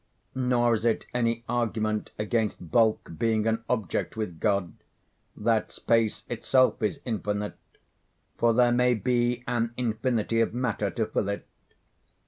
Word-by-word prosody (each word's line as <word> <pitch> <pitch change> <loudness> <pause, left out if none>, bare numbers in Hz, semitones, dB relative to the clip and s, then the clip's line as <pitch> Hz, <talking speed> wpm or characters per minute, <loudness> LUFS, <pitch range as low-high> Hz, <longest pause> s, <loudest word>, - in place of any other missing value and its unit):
Nor 125 -2 +2
is 110 -1 -1
it 115 -1 +1
any 115 -1 0
argument 110 -3 -1
against 105 -5 -1
bulk 110 -6 +2
being 110 -2 +1
an 115 0 0
object 110 -3 -1
with 90 -7 -4
God, 100 -4 +1 0.6
that 110 0 +1
space 115 -2 +1
itself 130 +2 +2
is 110 +6 -1
infinite; 105 -3 -3 0.8
for 120 0 +3
there 120 +1 +4
may 125 0 +3
be 120 +1 0
an 120 -1 -1
infinity 115 -1 0
of 115 - 0
matter 115 -5 -1
to 110 +2 -1
fill 105 -2 -1
it. 100 - -4
115 Hz, 135 wpm, -27 LUFS, 110-120 Hz, 0.8 s, there